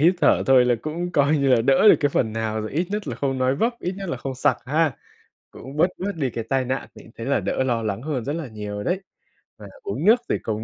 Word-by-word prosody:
hít 175 +5 +5
thở - - +4
thôi 130 -2 +6
là 125 -1 +3
cũng 170 +3 -3
coi 145 +2 +3
như 140 -1 +1
là 115 - +2
đỡ 135 - +5
được - - +9
cái 145 - +3
phần 110 -5 0
nào 110 -1 -2
rồi, 110 - -5
ít 170 +4 0
nhất 210 -1 -3
là - - -3
không 135 -2 -1
nói 130 +1 +2
vấp, 230 - +1
ít 180 - -2
nhất 195 -2 -6
là - - -2
không 135 -1 -5
sặc 130 - +2
ha? 150 -1 +1 0.6
Cũng 135 +3 -10
bớt 170 - +5
bớt 200 +2 -2
đi 135 -5 -1
cái 115 0 -4
tai 130 +2 0
nạn 130 +2 -3
thì - - -13
cũng 115 - -16
thấy 115 - -6
là 140 +2 +1
đỡ - - -1
lo 120 -3 0
lắng 105 0 -2
hơn 140 -4 -3
rất 145 - -2
là 160 -4 -4
nhiều 105 -2 -6
rồi 105 - -4
đấy. 185 +2 0 0.6
Và - - -11 0.2
uống 400 - -3
nước 235 +3 +6
thì - - +1
công 110 0 -4
135 Hz, 290 wpm, -23 LUFS, 120-165 Hz, 0.6 s, được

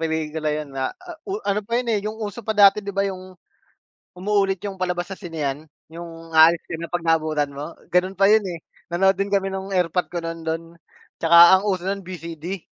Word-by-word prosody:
pelikula 160 -1 -2
yun 150 -2 -3
na 135 -1 -2 0.4
o 385 - -1
ano 205 +1 +1
pa 230 +3 -2
yun, 245 -1 -1
eh, 210 - +1
yung 215 +2 -5
uso 215 0 -5
pa 220 -1 -3
dati, 200 0 +7
di 200 - -10
ba, 200 - +2
yung 185 -1 -6 0.8
umuulit 195 0 +1
yung 195 -2 -6
palabas 180 +1 -2
sa - - -6
sinehan. 155 -4 -4 0.2
Yung 165 -1 -10
aalis 160 +1 +6
ka - - -10
na 170 - -5
'pag 175 0 -3
naabutan 155 -3 +1
mo, 150 +4 -7 0.2
ganon 185 +1 +1
pa 195 +2 +5
yun, 220 - +6
eh. 170 -2 -7 0.2
Nanood 190 +3 +3
din 200 +1 -1
kami 195 -1 0
nung 190 0 -5
erpat 180 -2 0
ko 170 -1 -5
nun 165 0 -5
dun. 160 0 -3 0.6
Tsaka 170 +2 +8
ang 210 - -3
uso 185 -2 -1
nun, 195 +1 -2
VCD. 175 -1 -7
180 Hz, 205 wpm, -22 LUFS, 165-195 Hz, 0.8 s, Tsaka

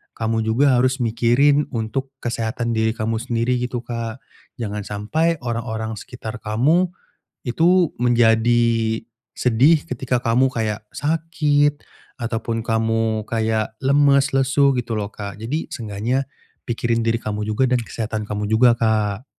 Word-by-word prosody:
kamu 110 0 -1
juga 125 +4 +3
harus 130 +1 +1
mikirin 120 +6 +3
untuk 120 +4 -3
kesehatan 115 0 -2
diri 110 0 +1
kamu 115 -1 -2
sendiri 120 +2 0
gitu 125 -1 -3
Kak, 115 +1 -5 0.4
jangan 105 -2 -4
sampai 155 +12 0
orang-orang 110 -2 -3
sekitar 115 -2 -8
kamu, 140 +13 +2 0.6
itu 170 +6 +3
menjadi 115 -1 +3 0.4
sedih 140 +7 +3
ketika 125 -1 -1
kamu 125 +3 +2
kayak 110 -3 -2
sakit, 150 -2 +1 0.4
ataupun 115 -1 -2
kamu 110 -1 0
kayak 110 -1 0
lemes, 140 0 +3
lesu, 135 +1 +3
gitu 115 -3 -2
loh 100 -1 -3
Kak. 100 -1 -7
Jadi, 130 +9 -4
seenggaknya 115 +5 -2 0.4
pikirin 115 -1 0
diri 115 - +2
kamu 105 0 -3
juga, 110 +5 +1
dan 125 - +3
kesehatan 110 -2 -4
kamu 105 0 -3
juga 115 +2 +5
Kak. 110 0 0
115 Hz, 130 wpm, -21 LUFS, 110-130 Hz, 0.6 s, juga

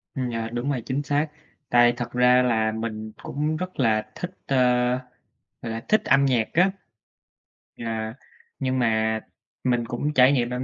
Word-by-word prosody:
Ừm, 130 -3 -2
yeah, 115 0 -4
đúng 120 +4 -2
rồi, 125 - -2
chính 140 +3 -2
xác. 145 +2 0 0.4
Tại 120 0 +5
thật 120 -1 -4
ra 125 0 +5
là 110 -3 +2
mình 110 -1 -5
cũng 150 +2 -2
rất 185 0 -6
là 110 -3 +1
thích, 180 - -5
ơ, 135 - 0 1.1
gọi 115 - -5
là, 115 +1 -5
thích 215 - +4
âm 140 0 +4
nhạc 120 -5 +2
á. 180 +3 +4 1.0
Yeah. 110 -1 -4 0.4
Nhưng 130 -1 0
mà 110 -2 +1 0.4
mình 120 -2 +1
cũng 140 +6 -2
trải 130 -1 +6
nghiệm 120 -4 +1
âm 125 +1 -3
125 Hz, 170 wpm, -24 LUFS, 115-135 Hz, 1.1 s, trải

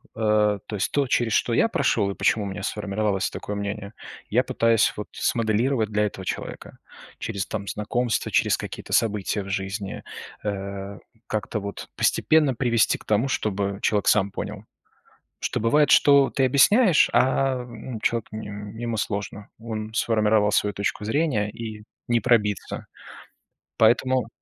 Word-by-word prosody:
Э, 105 -2 +2
то 105 - -5
есть 95 - -1
то, 140 -2 +1
через 120 -2 +1
что 120 - +1
я 170 - +4
прошёл 105 - +1
и - - -7
почему 105 -2 +1
у - - -3
меня 95 +1 -6
сформировалось 105 -1 -1
такое 105 - -6
мнение, 100 0 -5 0.4
я - - +3
пытаюсь 115 -1 +2
вот 105 - -6
смоделировать 115 +1 0
для 105 0 +1
этого 95 -2 -5
человека - - -6 0.4
через, 100 -4 -3
там, 100 -1 -5
знакомства, 110 +2 -1
через - - +3
какие-то - - -7
события 105 -2 +1
в 100 - -9
жизни. 100 +1 -4 0.4
Э, 100 -1 -4 0.3
как-то 110 0 -2
вот 100 -1 -7
постепенно 155 -4 +3
привести 115 -2 +2
к - - -18
тому, 110 +5 +2
чтобы 100 -5 -2
человек 105 -2 +1
сам 100 +1 +3
понял. 105 +1 -6 0.8
Что - - -1
бывает, 145 +7 +3
что 140 -1 +6
ты 135 - +1
объясняешь, 165 - +5
а, 130 -1 +2
ну, 120 0 -8
человек 115 0 0
ему 110 +2 -5
сложно. 100 0 -4
Он 110 -1 -5
сформировал 110 -2 +2
свою 105 -1 +1
точку 100 +2 -2
зрения, 110 -5 0
и 110 -1 -8 0.2
не 120 -1 +2
пробиться. 105 -3 0 0.9
Поэтому 125 +2 +3
110 Hz, 145 wpm, -24 LUFS, 100-120 Hz, 0.9 s, что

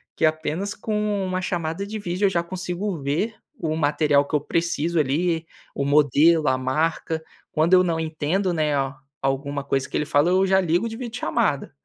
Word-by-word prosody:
que - - +2
apenas 160 +5 -1
com 210 -2 -1
uma 185 0 -1
chamada 175 +1 -2
de 215 +1 -5
vídeo 180 +1 -1
eu - - +5
já 175 -3 +1
consigo 180 +1 -4
ver 165 +12 -1 0.2
o 155 -1 -1
material 145 -1 +2
que 150 - -1
eu 145 - +2
preciso 170 +1 0
ali, 160 +4 0 0.3
o 140 - -1
modelo, 150 +2 +4
a 130 - +3
marca. 160 +4 -1 0.3
Quando 160 +4 +2
eu 185 0 +7
não 165 -2 0
entendo, 160 +4 -1
né, 155 -3 +1
a 135 -1 -1 0.2
alguma 140 +1 -1
coisa 135 -1 -1
que - - -7
ele 150 - 0
fala, 145 +3 +3
eu 190 +1 +3
já 190 0 +4
ligo 180 +5 +1
de 225 - -7
vídeo 240 -2 -6
chamada. 150 -12 0
165 Hz, 190 wpm, -23 LUFS, 145-185 Hz, 0.3 s, eu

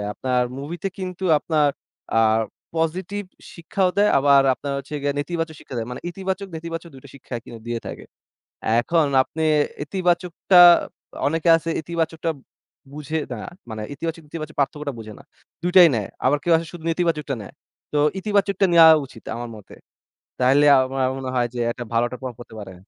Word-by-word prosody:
আপনার 125 +1 0 0.2
মুভিতে 170 +7 -4
কিন্তু 185 0 -5
আপনার 150 -2 +1 0.5
আ - - +4 0.6
পজিটিভ 180 +5 -2 0.3
শিক্ষাও 180 +2 0
দেয়। 210 - +5
আবার 140 0 +5
আপনার 140 +1 -5
হোচ্ছে 150 - -8
গিয়ে 145 0 +1
নেতিবাচক 165 +1 -3
শিক্ষা 130 - -10
দেয়। 115 - -3
মানে 125 - -6
ইতিবাচক 190 +1 -4
নেতিবাচক 165 +1 -6
২ 130 - -12
টা - - -12
শিক্ষা 135 -2 -9
কিন্তু 115 -1 -10
দিয়ে 120 -1 -2
থাকে। - - -7 0.8
এখন 160 +4 +2 0.2
আপনি 160 +4 -6 0.4
ইতিবাচকটা 180 +2 0 0.7
অনেকে 165 +3 0
আছে 165 0 -4
ইতিবাচকটা 165 0 -2 0.6
বুঝে 150 +2 -4
না - - -4 0.3
মানে 110 -1 -5
ইতিবাচক 165 +2 -5
নেতিবাচক 155 0 -7
পার্থক্যটা 145 0 -1
বুঝে 110 -1 -8
না। - - -14 0.4
দুইটাই 175 -1 +7
নেয়। 105 -4 -2 0.2
আবার 145 +3 +3
কেউ 170 - +2
আছে 165 0 -3
শুধু 170 -2 -10
নেতিবাচকটা 160 -5 -1
নেয়। 100 - -11 0.4
তো 150 - +1 0.2
ইতিবাচকটা 200 -1 +1
নেওয়া 165 -1 +9 0.2
উচিত 115 -3 -15
আমার 120 0 -5
মতে। 105 - -14 0.7
তাহলে 135 +3 +4
আম 130 -1 +2
আমার 130 -1 +1
মনে 130 -1 -5
হয় 120 -1 +2
যে 120 - -5
একটা 120 - -6
ভালো 115 - +3
একটা 125 - -8
প্রভাব 125 -3 -6
পড়তে 115 -2 -12
পারে। 95 -2 -9
155 Hz, 170 wpm, -22 LUFS, 130-170 Hz, 0.8 s, নেওয়া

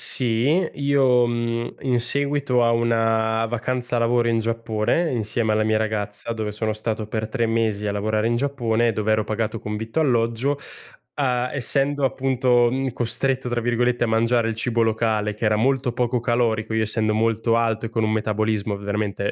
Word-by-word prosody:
Sì. 115 -1 +1 0.3
Io, 135 -4 +3
mhmm, 115 0 -2
in 125 -3 +1
seguito 140 0 0
a 115 - +3
una 115 -1 +1
vacanza 120 +1 -2
lavoro 120 0 +2
in 115 -1 +2
Giappone 115 +7 0
insieme 110 -1 -1
alla 110 0 +1
mia 110 0 +2
ragazza, 110 0 -3
dove 110 -2 -4
sono 110 +1 -2
stato 110 0 -3
per 110 0 -3
3 115 0 0
mesi 110 -2 0
a - - -1
lavorare 105 +2 0
in 120 - +1
Giappone, 120 -4 0
dove 110 0 -1
ero 110 -1 +1
pagato 110 +1 -2
con 105 0 -5
vitto 110 +6 -4
e - - +4
alloggio 120 +2 +1 0.6
a 125 -3 0
essendo 140 +1 0
appunto, 125 -1 +2
mhmm, 135 0 -1
"costretto", 125 +2 -1
tra 120 -1 -1
virgolette 120 +1 +1
a - - +1
mangiare 115 +1 +2
il 115 - -3
cibo 115 +1 0
locale 110 -1 0
che 105 +2 -4
era 105 0 +3
molto 130 +2 +1
poco 125 0 0
calorico, 115 -2 0
io 110 - +1
essendo 110 0 0
molto 115 +1 +1
alto 115 -1 0
e - - -4
con 115 -1 -1
un 110 - +1
metabolismo 110 -1 -1
veramente 100 0 -2
115 Hz, 180 wpm, -22 LUFS, 110-125 Hz, 0.6 s, e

